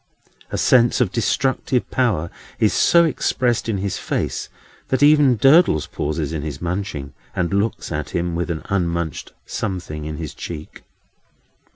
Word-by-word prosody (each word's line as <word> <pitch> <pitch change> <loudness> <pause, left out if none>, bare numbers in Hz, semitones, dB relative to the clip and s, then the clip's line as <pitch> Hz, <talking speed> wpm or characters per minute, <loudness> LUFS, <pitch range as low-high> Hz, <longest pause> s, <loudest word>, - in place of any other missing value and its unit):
A - - -2
sense 120 -2 +4
of 95 - +2
destructive 130 +2 0
power 110 -11 0 0.3
is - - +2
so 170 0 +5
expressed 125 -6 0
in 105 - 0
his 95 0 -3
face, - - -3 0.4
that 130 +1 +1
even 145 -4 +6
Durdles 135 - +5
pauses 75 0 -3
in 80 - -2
his 75 -1 -5
munching, 85 -6 -4 0.2
and 90 +1 -1
looks 100 0 -1
at 75 -1 -3
him, 85 +1 -2
with 85 +1 -2
an 80 -2 -3
unmunched 85 -4 -2
something 90 -7 -4
in 75 -1 -5
his 80 -1 -6
cheek. 80 -3 -8
90 Hz, 150 wpm, -21 LUFS, 80-120 Hz, 0.4 s, even